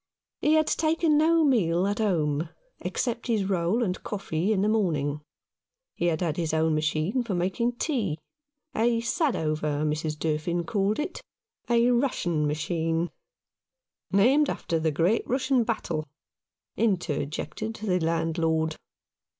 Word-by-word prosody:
He 305 Hz, +1 st, +3 dB
had 310 Hz, 0 st, +4 dB
taken 320 Hz, 0 st, +2 dB
no 325 Hz, +2 st, +4 dB
meal 185 Hz, -, +2 dB
at 205 Hz, +1 st, -1 dB
home, 160 Hz, -6 st, 0 dB, 0.3 s
except 240 Hz, -1 st, -2 dB
his 220 Hz, -5 st, +1 dB
roll 190 Hz, +4 st, +1 dB
and 185 Hz, -4 st, -2 dB
coffee 195 Hz, -2 st, -2 dB
in 200 Hz, -2 st, +2 dB
the -, -, +2 dB
morning. 155 Hz, -9 st, 0 dB, 0.7 s
He 175 Hz, -, -1 dB
had 160 Hz, -1 st, 0 dB
had 165 Hz, -3 st, -1 dB
his 160 Hz, -2 st, -1 dB
own 160 Hz, 0 st, +2 dB
machine 155 Hz, +9 st, 0 dB
for 225 Hz, -6 st, -3 dB
making 195 Hz, +7 st, 0 dB
tea 235 Hz, -, -1 dB, 0.3 s
— 290 Hz, +2 st, -40 dB
a 230 Hz, +1 st, +2 dB
Sadover, 155 Hz, -, 0 dB
Mrs. 155 Hz, 0 st, -2 dB
Durfin 160 Hz, +3 st, -1 dB
called 200 Hz, +3 st, 0 dB
it 300 Hz, +4 st, -4 dB, 0.2 s
— 455 Hz, -, -36 dB
a 235 Hz, +1 st, +4 dB
Russian 175 Hz, -, +1 dB
machine, 165 Hz, +2 st, -1 dB, 1.0 s
"named 260 Hz, +9 st, +4 dB
after 165 Hz, -2 st, -2 dB
the 160 Hz, 0 st, +1 dB
great 170 Hz, +9 st, +2 dB
Russian 260 Hz, -1 st, +2 dB
battle," 170 Hz, -9 st, -2 dB, 0.7 s
interjected 185 Hz, +2 st, -2 dB
the 195 Hz, -5 st, 0 dB
landlord. 160 Hz, -1 st, 0 dB
185 Hz, 135 wpm, -27 LUFS, 160-235 Hz, 1.0 s, had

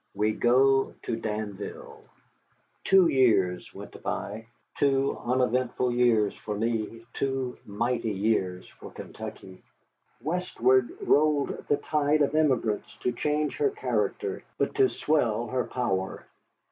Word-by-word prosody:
WE 105 Hz, +2 st, +2 dB
GO 135 Hz, +4 st, +3 dB
TO 115 Hz, -, -2 dB
DANVILLE 105 Hz, -2 st, -6 dB, 0.8 s
Two 190 Hz, -2 st, +6 dB
years 105 Hz, -, +2 dB
went -, -, -11 dB
by, 110 Hz, +2 st, -4 dB, 0.3 s
two 140 Hz, -1 st, +2 dB
uneventful 125 Hz, 0 st, +1 dB
years 120 Hz, -4 st, +3 dB
for 105 Hz, -1 st, -5 dB
me, 115 Hz, 0 st, -2 dB
two 135 Hz, -2 st, -2 dB
mighty 115 Hz, +2 st, -1 dB
years 95 Hz, -3 st, -1 dB
for -, -, -12 dB
Kentucky. 95 Hz, -1 st, -9 dB, 0.6 s
Westward 130 Hz, -5 st, +1 dB, 0.2 s
rolled 150 Hz, -1 st, +3 dB, 0.2 s
the 145 Hz, -, +3 dB
tide 150 Hz, 0 st, +1 dB
of 145 Hz, -, 0 dB
emigrants 130 Hz, -9 st, +1 dB
to 125 Hz, -, -1 dB
change 150 Hz, +5 st, -1 dB
her 435 Hz, -1 st, +2 dB
character, 420 Hz, 0 st, -2 dB, 0.2 s
but -, -, 0 dB
to 400 Hz, -2 st, +4 dB
swell 120 Hz, -, +1 dB
her 130 Hz, 0 st, -1 dB
power. 95 Hz, -7 st, -2 dB
125 Hz, 120 wpm, -27 LUFS, 110-145 Hz, 0.8 s, Two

